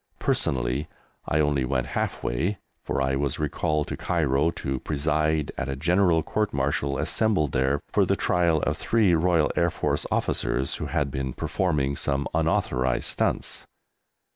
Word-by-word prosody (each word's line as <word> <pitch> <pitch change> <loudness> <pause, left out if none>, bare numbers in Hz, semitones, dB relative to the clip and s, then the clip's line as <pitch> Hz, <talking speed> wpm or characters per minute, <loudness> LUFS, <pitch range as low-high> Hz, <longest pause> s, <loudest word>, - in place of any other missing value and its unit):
Personally 65 +3 0 0.4
I 75 - +1
only 75 -3 +2
went 65 -1 0
half - - -2
way, 85 +12 -1 0.3
for 70 - -1
I 65 0 +1
was 70 -1 -1
recalled 75 0 0
to - - -2
Cairo 75 -2 +1
to 65 -5 -3
preside 75 +1 0
at - - -2
a 70 - -2
General 85 +2 +3
Court 105 +4 -1
Martial 70 0 0
assembled 95 -8 +1
there 65 +2 +1
for - - +3
the - - +2
trial 85 -3 +2
of 75 - 0
three 110 -3 +2
Royal 85 -1 +3
Air 85 - +3
Force - - -1
officers 65 +2 0
who - - -4
had 70 -1 -1
been 65 -1 -3
performing 75 -7 0
some 70 0 -1
unauthorised 65 -1 +1
stunts. - - -2
75 Hz, 155 wpm, -26 LUFS, 70-80 Hz, 0.4 s, General